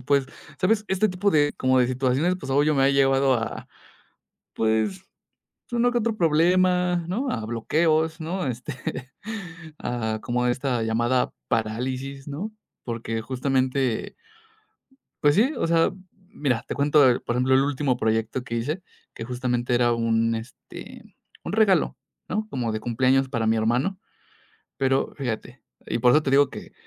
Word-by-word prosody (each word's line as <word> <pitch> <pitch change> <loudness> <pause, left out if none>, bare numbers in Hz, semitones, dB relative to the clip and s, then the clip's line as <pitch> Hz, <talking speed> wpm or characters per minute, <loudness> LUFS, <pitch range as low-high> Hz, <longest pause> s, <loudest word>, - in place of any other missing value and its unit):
pues, 140 +1 +1 0.3
¿sabes?, 210 +3 +2
este 190 +3 +2
tipo 190 +2 0
de, 145 -4 +3
como 130 0 +2
de 125 - +4
situaciones, 130 +7 +1
pues, - - -6
obvio, 145 +3 +3
me 135 - +3
ha 135 - +5
llevado 135 -1 +3
a, 115 -1 -4 0.9
pues, 110 - 0 0.7
uno 240 +1 +3
que 240 - +2
otro 230 -1 -1
problema, 180 +1 +3
¿no?, 245 +10 -1
a 115 - -3
bloqueos, 160 +7 +1
¿no?, 175 +2 -3
este, 125 +3 -4 1.0
a 110 -3 -2
como 125 0 -1
a 125 - +3
esta 125 -1 -1
llamada 120 +3 +1 0.2
parálisis, 130 +5 -2
¿no?, 175 +10 -5 0.3
porque, 115 -1 -3
justamente, 130 0 -1 1.1
pues 145 -1 +4
sí, 235 +9 +4
o - - 0
sea, 165 0 +3 0.4
mira, 130 -10 -1
te - - -3
cuento 145 +1 +4
de, 125 -1 +4
por 120 - -3
ejemplo, 130 +1 +3
el 135 - +5
último 140 -2 0
proyecto 110 +3 -1
que 120 - -5
hice, 150 +10 -2 0.3
que - - -6
justamente 125 0 -1
era 120 -1 +3
un, 115 0 +1
este, 115 +3 -10 0.4
un - - -5
regalo, 205 -6 +3 0.3
¿no?, 215 0 -2
como 120 - -2
de 110 - -2
cumpleaños 130 +3 +2
para 115 -3 -1
mi 110 - +3
hermano. 125 - 0 0.8
Pero 135 0 +1
fíjate 125 -1 -5 0.2
y - - -1
por 125 +1 +5
eso 150 - +4
te 140 - -1
digo 140 +1 +4
que - - -10
135 Hz, 155 wpm, -24 LUFS, 120-160 Hz, 1.1 s, ha